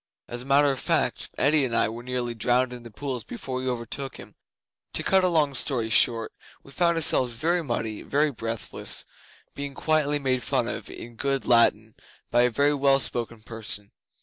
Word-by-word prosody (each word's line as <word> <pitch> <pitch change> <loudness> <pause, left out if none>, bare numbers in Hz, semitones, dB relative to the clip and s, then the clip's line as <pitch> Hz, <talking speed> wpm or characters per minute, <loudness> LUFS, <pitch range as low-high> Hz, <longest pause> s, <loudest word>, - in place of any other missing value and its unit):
As 120 0 -4
a - - -8
matter 140 +1 +4
of 135 - -4
fact, - - 0
Eddi 145 +2 +3
and 120 -3 -1
I - - +4
were 115 +2 -7
nearly 125 -1 -3
drowned 125 +2 +1
in 125 - -8
the 120 - -11
pools 125 +3 -5
before 135 - -5
we 130 0 -2
overtook 125 +2 -4
him. - - -12 0.6
To - - +1
cut 190 -1 +3
a - - +4
long 155 -5 +2
story 125 -3 0
short, 115 +1 +3 0.3
we 140 - -15
found 170 +1 +1
ourselves 130 -6 +3
very 170 +8 0
muddy, 115 -5 -3
very 150 +1 +1
breathless, 115 -3 -3 0.5
being 140 -1 -6
quietly 150 -2 +1
made 130 -3 0
fun - - 0
of - - -5
in 120 0 -10
good 135 +1 -1
Latin 110 -2 +3 0.4
by 120 - +4
a 125 - +4
very 140 +5 +2
well 140 -1 +3
spoken 115 -4 -3
person. 110 -3 0
130 Hz, 190 wpm, -25 LUFS, 115-140 Hz, 0.6 s, matter